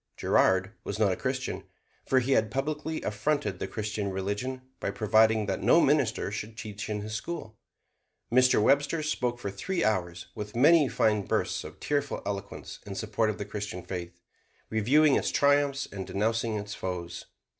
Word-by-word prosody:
Girard 95 +1 +3
was - - -4
not 105 -3 +3
a - - 0
Christian, 130 +3 -3 0.4
for 130 -1 +4
he 130 +3 -1
had 110 -4 +3
publicly 150 +5 -3
affronted 145 +8 -1
the - - -3
Christian 105 -1 -3
religion 100 +7 -3 0.2
by - - -2
providing 110 +1 +3
that 95 -1 -2
no 120 - +5
minister 135 - +2
should 110 +1 -6
teach 105 -1 -6
in 105 -1 -2
his 110 +1 -6
school. 110 -1 -5 0.8
Mr. 125 -1 +5
Webster 145 +7 +2
spoke 125 -5 -1
for 100 -5 -4
three 175 - -2
hours 90 -5 -1
with 105 0 -7
many 150 +4 +6
fine 105 -4 +2
bursts - - 0
of - - -10
tearful 145 -1 -1
eloquence 100 -1 -5
in 100 -1 -7
support 110 +2 0
of 110 - -3
the 100 - -4
Christian 100 -3 -5
faith, 85 -2 -6 0.5
reviewing 135 +8 +4
its - - 0
triumphs 140 -1 +2
and 95 -1 -6
denouncing 115 +2 0
its 105 0 -5
foes. 90 -3 -5
110 Hz, 165 wpm, -28 LUFS, 100-135 Hz, 0.8 s, many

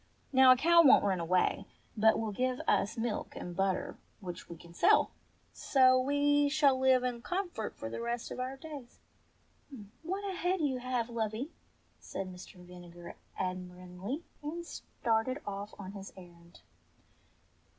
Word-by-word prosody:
Now 260 0 +8
a - - +8
cow 335 +5 +6
won*t 280 -9 +6
run 190 -3 +1
away, 180 +2 +1 0.3
but 220 0 +4
will 220 -1 -2
give 255 +4 -1
us 210 +4 +1
milk 225 -2 -3
and 175 -1 -7
butter, 195 0 -1 0.2
which 180 -4 -8
we 170 - -8
can 170 +1 -15
sell. - - +4 0.4
So 255 -1 +4
we 285 +1 +2
shall 285 -3 +3
live 260 -1 +4
in 245 -2 -2
comfort 355 - -4
for - - -5
the 115 - -5
rest 235 0 -3
of - - -6
our 260 +2 -4
days." 285 -5 -10 1.0
"What 380 +5 -4
a 385 - -3
head 360 +2 0
you 275 -5 0
have, 250 -2 -1
lovey," 230 +4 -3 0.5
said 185 -1 -6
Mr. 180 +3 -12
Vinegar 175 -1 -11 0.2
ad 185 -1 -1
miringly, 180 - -7 0.2
and 330 +4 -5
started 235 -4 -2
ofl^ 205 +1 -6
on 190 -1 -7
his 195 -1 -9
errand. 170 -1 -15
235 Hz, 155 wpm, -32 LUFS, 190-275 Hz, 1.0 s, Now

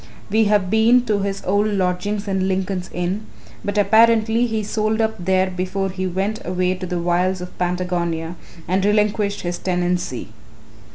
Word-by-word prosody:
We 220 +1 +4
have 205 -3 +2
been 230 +3 +4
to 210 -3 +1
his 195 0 -3
old 205 +3 +2
lodgings 200 +1 -1
in 190 -1 0
Lincoln's 190 -1 -2
Inn, 180 +5 -3 0.4
but 205 0 -2
apparently 225 +3 +4
he 220 -2 -2
sold 215 +1 -1
up 220 0 +1
there 185 +1 +2
before 185 +1 -2
he 185 0 -3
went 195 +4 -2
away 180 0 0
to 185 0 -6
the 180 - -2
wilds 180 +2 +1
of 180 0 -8
Patagonia 175 -2 -1 0.3
and 190 +2 +1
relinquished 210 0 +1
his 175 0 -3
tenancy. 175 - -1
190 Hz, 160 wpm, -21 LUFS, 180-210 Hz, 0.4 s, We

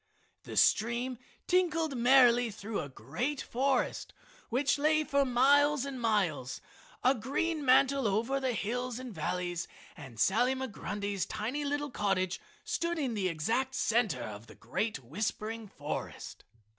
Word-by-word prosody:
The - - -7
stream 235 +3 +2 0.3
tinkled 330 -5 +1
merrily 245 -1 +5
through 205 0 -5
a 145 - -5
great 245 - -3
forest 265 +1 -1 0.3
which 280 +4 +1
lay 310 +1 +3
for 280 -2 +2
miles 280 +3 +4
and 270 -3 -5
miles, 180 - 0 0.4
a 255 - +5
green 285 +6 -1
mantle 270 -1 +4
over 230 +7 0
the 260 -2 0
hills 240 +3 -2
and 255 -3 -7
valleys, 175 -2 -2 0.3
and 115 -4 -11
Sally 240 - +3
Migrundy's 205 -6 -3
tiny 255 +8 -3
little 290 0 -2
cottage 190 -4 0 0.2
stood 345 -6 -1
in 270 -6 -1
the 200 -4 0
exact 230 +11 -1
center 215 - +1
of 105 0 -8
the - - -13
great 210 - -2
whispering 215 - -3
forest. - - -6
240 Hz, 135 wpm, -31 LUFS, 200-275 Hz, 0.4 s, merrily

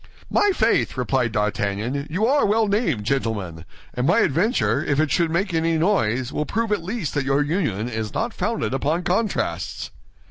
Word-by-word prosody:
"My 415 - +3
faith!" - - +1
replied 125 -1 0
D'Artagnan, 105 +6 -1
"you 185 +8 0
are 280 +4 +3
well 215 +2 +2
named, 200 - 0
gentlemen; 105 -9 -2 0.3
and 125 +2 -1
my 205 +7 +4
adventure, 185 - +1
if 145 -1 0
it 155 -3 +1
should 170 +1 +2
make 175 +3 -1
any 165 0 +1
noise, 130 - +1
will 150 - 0
prove 225 +1 -1
at 210 - +1
least 195 -3 -3
that 145 - 0
your 140 +2 +2
union 145 - -1
is 110 -3 -4
not 230 0 -2
founded 230 - -2
upon 150 +6 0
contrasts." 190 +4 -1
155 Hz, 175 wpm, -23 LUFS, 120-200 Hz, 0.3 s, my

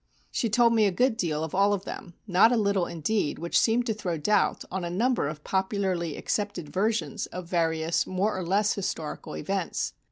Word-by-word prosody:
She 230 - 0
told 235 +1 +4
me 220 -2 +4
a - - +1
good 245 +6 +2
deal 160 -7 -1
of 160 - -5
all 200 +2 +4
of 200 0 -3
them, 175 -2 -8
not 200 +3 +5
a 245 - +3
little, 200 -4 +1
indeed, 170 0 -1
which 170 +2 +1
seemed 235 +1 +2
to 225 - 0
throw 185 -6 -3
doubt 205 +7 +1
on 190 0 -3
a 170 - -2
number 230 - +1
of 150 0 -6
popularly 190 -4 -1
accepted 205 -7 -2
versions 215 +3 -1
of 180 0 -7
various 165 -1 0
more 195 +3 0
or 185 - -3
less 200 +4 +2
historical 165 -6 -4
events. 190 +2 -2
190 Hz, 195 wpm, -27 LUFS, 170-215 Hz, -, not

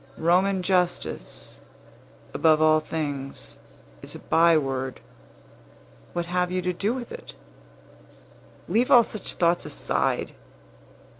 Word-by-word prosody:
Roman 185 +3 +2
justice, 180 -1 -2 0.7
above 155 -1 +4
all 155 0 +5
things, 145 -3 -5 0.4
is - - -5
a - - -8
byword. 135 -6 +1 1.1
What 175 -1 -2
have 180 +1 -1
you 185 0 -1
to 180 0 -1
do 200 +5 -1
with 245 -1 -6
it? - - -10 1.3
Leave 230 +7 +1
all 240 -2 +8
such 215 -3 -4
thoughts 170 0 +1
aside! - - -1
175 Hz, 105 wpm, -25 LUFS, 155-185 Hz, 1.3 s, all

